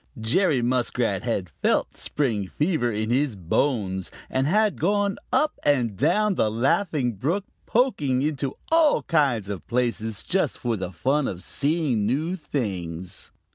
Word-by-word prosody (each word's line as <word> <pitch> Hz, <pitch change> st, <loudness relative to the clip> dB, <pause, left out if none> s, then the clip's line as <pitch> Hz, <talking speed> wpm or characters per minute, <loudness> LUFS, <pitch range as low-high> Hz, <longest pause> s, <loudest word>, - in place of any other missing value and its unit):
Jerry 125 Hz, -, +2 dB
Muskrat 120 Hz, -5 st, 0 dB
had 100 Hz, -8 st, -2 dB
felt -, -, +2 dB
the -, -, -14 dB
spring 115 Hz, -9 st, -1 dB
fever 150 Hz, -, 0 dB
in 110 Hz, +1 st, -2 dB
his 130 Hz, -2 st, +1 dB
bones 95 Hz, -, -1 dB, 0.2 s
and 130 Hz, +1 st, +1 dB
had 210 Hz, +4 st, +2 dB
gone 200 Hz, +3 st, +1 dB
up 305 Hz, -, +1 dB
and 125 Hz, -8 st, +2 dB
down 210 Hz, -, +2 dB
the 110 Hz, -, +1 dB
Laughing 130 Hz, -, +1 dB
Brook, 165 Hz, -, -1 dB, 0.2 s
poking 145 Hz, -, +1 dB
into 140 Hz, -3 st, -2 dB, 0.2 s
all 325 Hz, -2 st, +4 dB
kinds 135 Hz, -, +1 dB
of 100 Hz, -3 st, -6 dB
places 115 Hz, -3 st, -1 dB
just 185 Hz, -6 st, 0 dB
for 120 Hz, -2 st, -1 dB
the 95 Hz, -3 st, -4 dB
fun 135 Hz, +8 st, +1 dB
of 90 Hz, 0 st, -5 dB
seeing 140 Hz, -8 st, 0 dB
new 155 Hz, +9 st, 0 dB
things. 95 Hz, -, -4 dB
130 Hz, 145 wpm, -25 LUFS, 110-155 Hz, 0.2 s, all